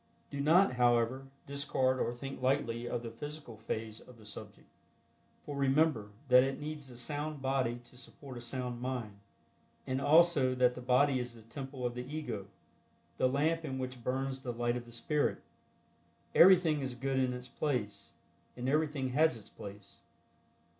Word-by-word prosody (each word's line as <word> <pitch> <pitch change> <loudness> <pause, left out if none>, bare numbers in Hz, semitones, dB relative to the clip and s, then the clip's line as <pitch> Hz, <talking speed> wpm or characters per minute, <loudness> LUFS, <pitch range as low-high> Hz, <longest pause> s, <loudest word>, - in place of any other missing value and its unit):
Do 140 - -4
not, 155 -1 +4
however, 120 +2 +2 0.2
discard 130 -2 +1
or - - 0
think 135 +2 -7
lightly 120 -3 0
of 120 -1 -2
the 115 - -5
physical 145 0 -8
phase 110 0 -4
of 125 - -15
the 110 - -16
subject, 105 - -9 0.8
for 145 - -5
remember 135 -5 +2 0.2
that 125 -1 +8
it 135 +2 -2
needs 150 -2 -5
a 120 - -11
sound 145 +4 -2
body 130 -3 0
to 120 - -16
support 130 +1 -9
a 120 - -7
sound 120 0 -3
mind, 120 -6 -4 0.7
and 130 +1 -1
also 150 -4 +5
that 125 -1 +4
the 125 - -8
body 130 +2 +3
is 120 -1 -4
the 110 -1 -15
temple 135 0 -6
of 120 - -1
the 125 - -4
Ego, 125 -7 -5 0.7
the 130 - +4
lamp 160 +5 +1
in 135 -4 -3
which 130 -2 -5
burns 135 +1 -1
the 125 - -3
light 120 0 0
of 120 -1 -5
the 120 - -13
Spirit. 145 +6 0 0.9
Everything 170 -5 +6
is 130 -2 -3
good 135 +2 -1
in 130 -1 +2
its 125 0 -6
place, 125 -9 -3 0.4
and 125 +1 -3
everything 145 -2 +1
has 145 0 +3
its 110 - -13
place. 100 0 -11
130 Hz, 170 wpm, -33 LUFS, 120-140 Hz, 0.9 s, that